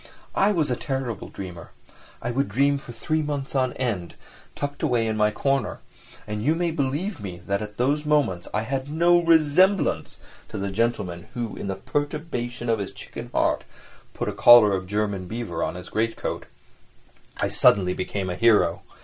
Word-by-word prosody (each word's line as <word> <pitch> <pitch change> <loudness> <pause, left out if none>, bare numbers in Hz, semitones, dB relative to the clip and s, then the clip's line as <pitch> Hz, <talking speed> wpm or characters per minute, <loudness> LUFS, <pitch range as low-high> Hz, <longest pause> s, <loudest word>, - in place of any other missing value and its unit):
I 200 - +3
was 160 -9 +1
a - - +2
terrible 130 -6 -3
dreamer, 90 -4 -8 0.5
I 120 - -1
would 135 +1 0
dream 140 +6 +2
for 125 - -10
three 155 +7 -1
months 145 -2 -3
on 130 -2 +1
end, 105 -10 -3 0.4
tucked 145 0 -4
away 125 -7 +2
in 110 -1 -1
my 105 0 +3
corner, 135 +2 -1 0.5
and 105 0 -4
you 155 +6 +3
may 170 0 0
believe 155 - -2
me 95 -4 -6
that 100 0 -1
at 105 -1 -7
those 145 +5 +1
moments 145 - +1
I 105 - -1
had 135 +3 -3
no 170 +3 +4
resemblance 165 +4 +3 0.3
to - - -6
the 100 0 -2
gentleman 95 -5 -1
who, 120 -3 -3
in - - -5
the 95 - -2
perturbation 130 0 -3
of 115 -1 +2
his 100 - -4
chicken - - -8
heart, - - +1 0.5
put - - -3
a - - -1
collar 120 -4 +8
of 95 -1 -2
German 100 -2 -1
beaver 110 -5 -4
on - - -2
his 90 - -8
great 115 +1 0
coat. - - -4 0.9
I - - 0
suddenly 90 -3 +4
became 95 0 -3
a - - -3
hero. 105 -6 +3
120 Hz, 180 wpm, -25 LUFS, 100-145 Hz, 0.9 s, collar